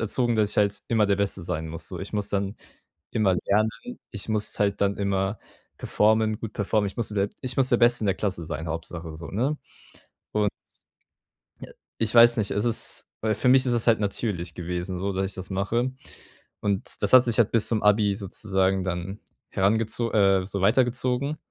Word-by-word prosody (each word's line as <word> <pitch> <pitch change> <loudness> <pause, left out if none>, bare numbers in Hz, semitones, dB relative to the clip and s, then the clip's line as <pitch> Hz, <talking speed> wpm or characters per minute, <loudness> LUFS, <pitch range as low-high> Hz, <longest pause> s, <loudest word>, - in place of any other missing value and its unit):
erzogen, 120 +2 0
dass 105 -1 +2
ich - - -5
halt 100 0 +2
immer 110 -3 +3
der 100 -1 +2
Beste 100 -2 -2
sein 80 -1 -4
muss 80 +1 -7
so. 90 - -6
Ich 95 - -7
muss 105 -1 -2
dann 100 +1 -2 0.6
immer 100 -5 +2
lernen 105 +2 +3 0.4
ich 105 +1 -5
muss 105 -1 -1
halt 100 -1 +1
dann 100 0 +1
immer 100 +1 -1 0.4
performen 110 0 +2
gut 110 -2 -6
performen. 105 0 0
Ich 95 - -8
musste 110 -2 -2
der 100 0 +1
ich 130 -1 -3
muss 130 -1 +3
der 120 - +4
Beste 120 0 +3
in - - 0
der 95 - +2
Klasse 95 -5 -3
sein, 80 +1 -5
Hauptsache 80 0 -6
so, 85 - -8
ne? 130 +9 0 0.8
Und 105 -1 +2 1.1
ja, - - -10 0.3
ich 110 0 -1
weiß 120 0 +7
nicht. 105 -3 -1
Es 105 - -1
ist 115 -1 -2
weil 110 -1 0
für 125 +5 0
mich 130 0 +6
ist 125 - 0
es 120 0 0
halt 115 -2 +4
natürlich 95 -5 -2
gewesen 90 +1 -4
so, 100 +1 -2
dass 95 +1 0
ich 95 - -6
das 95 0 -7
mache. 115 +7 -1 0.7
Und 100 -2 -1
das 105 - +2
hat 130 -1 +9
sich 120 -3 +1
halt 115 -2 +3
bis 115 -2 +2
zum 110 -2 0
Abi 105 -1 +3
sozusagen 95 -1 -1
dann 90 +2 -4 0.3
herangezo 110 +4 0
äh, 95 -3 +3
so 100 0 -4
weitergezogen. 125 +6 +1
105 Hz, 200 wpm, -25 LUFS, 95-115 Hz, 1.1 s, hat